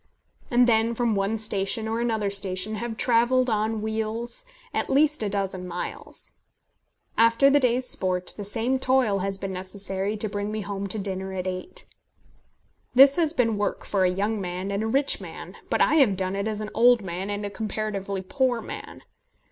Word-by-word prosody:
And 245 0 +5
then, 230 0 +3
from 235 -1 +1
one 200 +2 0
station 215 0 0
or 225 +1 -1
another 220 -4 0
station, 195 +1 -2
have 225 0 -4
travelled 250 +1 +3
on 215 0 0
wheels 220 - -3 0.3
at - - -1
least 300 +1 +3
a 210 - 0
dozen 190 -2 -2
miles. 175 0 -5 0.9
After 230 +5 +5
the 290 - +5
day's 250 -1 +1
sport, 180 -4 -1
the 205 - -6
same 230 +6 -1
toil 255 -6 +2
has 195 +1 -2
been 195 0 -4
necessary 190 +2 -3
to 215 - 0
bring 205 0 -3
me 215 0 -3
home 200 0 -4
to 195 - -3
dinner 190 -1 -4
at 185 -1 -3
eight. 185 - -5 1.1
This 275 +2 +8
has 325 -3 +3
been 230 -9 +1
work 205 - -2
for 195 -2 +1
a 185 - +4
young 205 +3 -1
man 185 +2 -4
and 200 +1 -1
a 220 - -1
rich 275 +5 +1
man, - - -9
but - - +1
I - - +4
have 245 -10 +5
done 185 0 0
it 200 +2 -1
as 215 -1 -2
an 215 - -5
old 240 -1 +5
man 185 +2 -4
and 205 0 -3
comparatively 200 -2 -3
a - - -14
poor 255 +3 +1
man. - - -8
215 Hz, 190 wpm, -25 LUFS, 195-235 Hz, 1.1 s, This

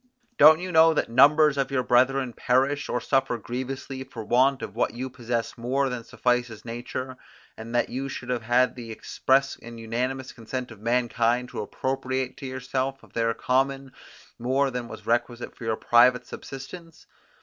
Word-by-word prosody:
Don't 155 +2 +8
you 180 0 -5
know 160 -1 +6
that 115 - -1
numbers 145 +3 +5
of 135 - 0
your 135 -2 0
brethren 125 +1 +2
perish, 135 +5 +1
or 125 - 0
suffer 135 -2 0
grievously 130 +3 -5
for 125 -4 -8
want 130 +5 +2
of 100 - -7
what 115 -1 0
you 130 +2 -5
possess 120 -2 -3
more 135 +3 0
than 125 -2 -5
suffices 125 -2 -1
nature, 125 +2 -5 0.4
and 115 +2 -7
that 120 - +2
you 135 +2 -4
should 125 -2 -7
have 125 -2 -1
had 120 +3 +2
the 120 -2 -8
express 135 +4 0
and 115 0 -11
unanimous 125 +4 -3
consent 125 +2 -6
of 105 -2 -13
mankind 120 +1 +1
to - - -5
appropriate 130 +3 -3
to 135 - -7
yourself 130 +1 -3
of - - -19
their 115 -1 0
common, 135 +1 0 0.5
more 135 +3 +1
than 125 -1 -4
was - - -10
requisite 120 +1 -1
for 120 - -9
your 110 -1 0
private 125 +1 +4
subsistence? 165 +5 -10
125 Hz, 170 wpm, -26 LUFS, 120-135 Hz, 0.5 s, Don't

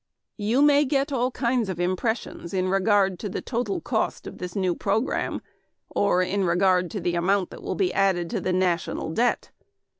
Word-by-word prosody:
You 225 +7 +2
may 290 0 +5
get 280 0 0
all 250 -2 +1
kinds 245 -4 0
of 180 -2 -4
impressions 185 0 -2
in 185 0 +1
regard 195 -1 +2
to 210 - -4
the - - -3
total 235 -4 -2
cost - - -2
of - - -9
this 180 -1 -6
new 185 -3 +1
program, 215 +8 -1 0.5
or 185 -3 +2
in 195 +2 -1
regard 180 0 +2
to 210 - -4
the 175 -1 -1
amount 180 +2 +1
that - - -10
will - - -3
be 185 -3 0
added 190 -3 +2
to - - -2
the 185 - -1
net 185 +1 +1
national 170 -2 -2
debt. 235 +8 0
195 Hz, 190 wpm, -25 LUFS, 180-230 Hz, 0.5 s, may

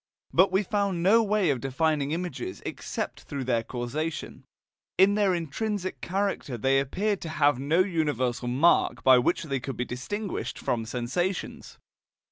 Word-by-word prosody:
But 185 +2 +5
we 190 +2 +2
found 200 -3 -1
no 220 +5 +6
way 210 -6 +2
of 130 -4 -2
defining 145 +1 0
images 180 - -4
except - - -4
through 140 -3 -5
their 120 -2 +1
causation; 130 +7 -4 0.5
in 190 +2 +6
their 200 -3 +2
intrinsic 185 +4 -3
character 190 -9 -2
they 135 +4 +3
appeared 195 +9 -1
to 165 - -5
have 145 -4 +2
no 155 +6 +2
universal 145 - -1
mark 135 +8 +3
by 130 -1 +7
which 170 +9 +1
they 135 -4 -2
could 130 0 -6
be 125 - -1
distinguished 195 - -4
from 115 -2 -2
sensations. 130 - -3
160 Hz, 150 wpm, -27 LUFS, 130-190 Hz, 0.5 s, by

